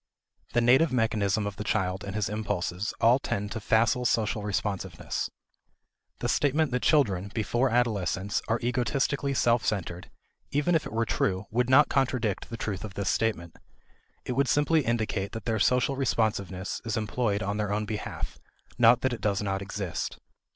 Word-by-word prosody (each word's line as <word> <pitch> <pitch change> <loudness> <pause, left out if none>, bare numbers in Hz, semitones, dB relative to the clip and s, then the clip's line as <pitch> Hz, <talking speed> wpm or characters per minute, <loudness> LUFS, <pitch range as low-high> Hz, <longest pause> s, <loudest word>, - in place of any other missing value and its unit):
The 120 - +3
native 130 +7 +5
mechanism 110 -4 +1
of 105 -1 -5
the 105 - -4
child 95 -1 -1
and 100 0 -6
his 105 -1 0
impulses 105 -2 -2
all 120 +3 +5
tend 105 -6 -3
to - - -3
facile 110 +3 +2
social 110 -3 +1
responsiveness. 95 -4 -3 0.9
The - - 0
statement 145 +1 +2
that 125 0 0
children, 100 - +2
before 120 +4 +1
adolescence, 105 -5 0
are 115 +1 +1
egotistically 135 +3 0
self 120 -2 +3
centered, 90 -4 -3 0.4
even 150 +5 +1
if 160 - +1
it - - -10
were 115 +1 0
true, 95 -2 0
would 125 +2 +1
not 135 +3 +7
contradict 125 -6 0
the 115 - -5
truth 100 -4 -4
of 105 -3 -7
this 100 -2 -1
statement. 85 -8 -1 0.7
It - - -3
would 135 +2 +1
simply 150 +2 +3
indicate 110 -5 -1
that 115 -2 -6
their 110 -2 0
social 125 +5 +2
responsiveness 105 -7 -1
is 115 -1 -2
employed 105 -1 -1
on 100 +2 -2
their 105 -1 -1
own 105 +1 0
behalf, 105 0 -5 0.4
not 120 +1 +6
that 130 -1 +1
it 120 - -6
does 100 -1 0
not 95 -1 -2
exist. 100 -3 -4
110 Hz, 170 wpm, -28 LUFS, 100-125 Hz, 0.9 s, not